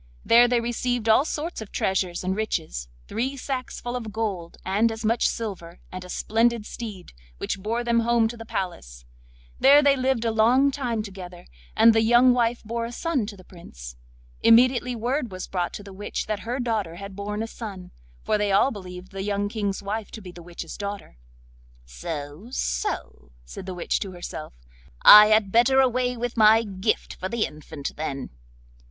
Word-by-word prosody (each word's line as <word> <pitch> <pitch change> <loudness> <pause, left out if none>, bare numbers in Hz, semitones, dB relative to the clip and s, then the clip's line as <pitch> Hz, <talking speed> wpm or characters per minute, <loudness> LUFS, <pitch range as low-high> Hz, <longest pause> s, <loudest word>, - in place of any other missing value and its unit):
There 240 +1 +6
they 245 0 +2
received 240 0 -2
all 225 +6 +5
sorts 320 -2 -4
of 215 - -9
treasures 185 -2 -1
and 185 +1 -1
riches, - - -3 0.2
three 260 +6 -2
sacks 260 -1 -4
full 245 0 -5
of 225 -3 -5
gold, 200 -6 -4
and 210 +5 +2
as 225 0 -6
much 230 +2 +2
silver, 185 -6 -5
and 185 0 -7
a 180 - -12
splendid 230 +2 +1
steed, 210 - -8 0.2
which 195 - -3
bore 230 +4 -2
them 235 -1 +2
home 230 -1 +3
to 240 - -7
the 225 - -9
palace. - - -5 0.5
There 285 +2 +7
they 280 -1 +5
lived 260 -3 0
a 225 - +2
long 245 +6 +4
time 245 -6 -2
together, 185 -3 -10 0.3
and 230 - +7
the 225 - +3
young 240 +3 +5
wife 240 -1 0
bore 230 +1 -3
a 235 - -6
son 270 -4 -1
to 205 -2 -8
the 185 - -14
Prince. 60 - -11 0.5
Immediately 245 +1 +4
word 245 +1 -2
was 185 0 -6
brought 175 -2 -2
to 205 - -7
the 200 -1 -11
witch 205 +2 -4
that 215 -1 -2
her 240 +5 -4
daughter 220 -9 -2
had 200 +2 -9
borne 210 +2 -3
a - - -4
son—for 180 - -6
they 205 -1 +1
all 200 +8 +4
believed 185 -3 -9
the 195 - -5
young 205 0 -1
King's 205 -3 -3
wife 210 +2 -4
to - - -9
be 185 -3 -9
the 175 - -12
witch's 170 -1 -8
daughter. 200 - -6 0.7
'So, 145 - -7
so,' 60 - -3
said 125 - -9
the 185 - -5
witch 175 - -1
to 195 -3 -5
herself; 175 -3 -7 0.5
'I 210 0 +11
had 215 -2 +3
better 245 +4 +4
away 250 -1 +2
with 240 0 -4
my 220 +1 +6
gift 200 0 -2
for 185 - -5
the 235 0 0
infant, 150 -1 -7
then. 140 -3 -4
215 Hz, 185 wpm, -25 LUFS, 185-235 Hz, 0.7 s, I